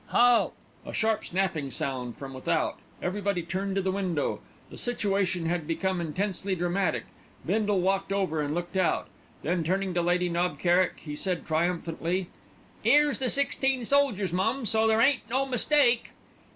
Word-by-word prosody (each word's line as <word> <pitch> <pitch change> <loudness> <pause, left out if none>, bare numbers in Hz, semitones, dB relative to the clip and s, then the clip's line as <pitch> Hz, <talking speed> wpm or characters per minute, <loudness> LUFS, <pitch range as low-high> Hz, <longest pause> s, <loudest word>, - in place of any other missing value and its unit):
"Halt!" 245 -1 +4 0.3
A - - -7
sharp 220 0 +1
snapping 175 -6 -1
sound 125 -3 -3
from 135 -1 -8
without. 130 - -1 0.2
Everybody 195 -1 -1
turned 190 +3 -3
to 195 - 0
the 190 - +1
window. 185 -6 -1 0.3
The - - -10
situation 195 -7 0
had 165 -2 -1
become 185 +2 -1
intensely 190 +3 -2
dramatic. 175 +1 0 0.4
Bindle 205 0 +1
walked 195 +1 0
over, 185 -6 0
and 145 +1 -2
looked 175 +2 -4
out. 185 -2 +1 0.3
Then 170 +2 0
turning 190 +3 0
to 175 - +1
Lady 175 +1 +1
Knob 175 +1 0
Kerrick 180 +1 +2
he 150 -2 -6
said 180 +2 -2
triumphantly: 170 +2 -1 0.5
"'Ere's 290 +5 +4
the 260 -2 0
sixteen 270 -2 +1
soldiers, 225 -10 +2
mum, 230 +8 0
so 220 +1 +3
there 220 0 +3
ain't 255 -3 +3
no 265 +3 +1
mistake." 255 -1 +3
190 Hz, 155 wpm, -28 LUFS, 175-220 Hz, 0.5 s, Halt